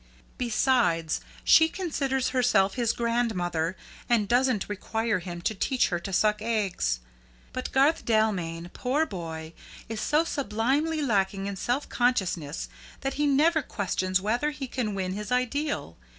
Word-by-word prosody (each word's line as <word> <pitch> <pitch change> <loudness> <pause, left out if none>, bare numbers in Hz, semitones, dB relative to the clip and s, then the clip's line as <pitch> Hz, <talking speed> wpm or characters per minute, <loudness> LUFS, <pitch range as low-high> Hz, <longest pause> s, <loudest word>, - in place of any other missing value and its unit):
Besides, 235 - +2 0.2
she 320 0 +6
considers 280 -8 -1
herself 215 -7 +3
his 240 -3 +1
grandmother, 190 -9 -1 0.3
and 225 -4 +3
doesn't 245 -2 +2
require 220 +1 -1
him 175 -1 -7
to 220 - +1
teach 255 +5 +1
her 175 - -1
to 195 +3 -6
suck 210 +2 +2
eggs. 195 - 0 0.5
But 255 - -4
Garth 280 +5 +3
Dalmain, 180 -7 0
poor 275 +5 +1
boy, 165 - -6 0.3
is 225 -1 -4
so 305 +2 +3
sublimely 285 +3 0
lacking 195 -5 +1
in 200 0 -3
self 245 +8 -1
consciousness 185 - 0 0.3
that 270 0 -2
he 295 - +3
never 310 +4 +4
questions 185 -5 -1
whether 235 +9 0
he 290 -2 -5
can 235 -5 -2
win 185 -1 -2
his 210 +3 -5
ideal. 250 - -1
225 Hz, 140 wpm, -27 LUFS, 190-260 Hz, 0.5 s, she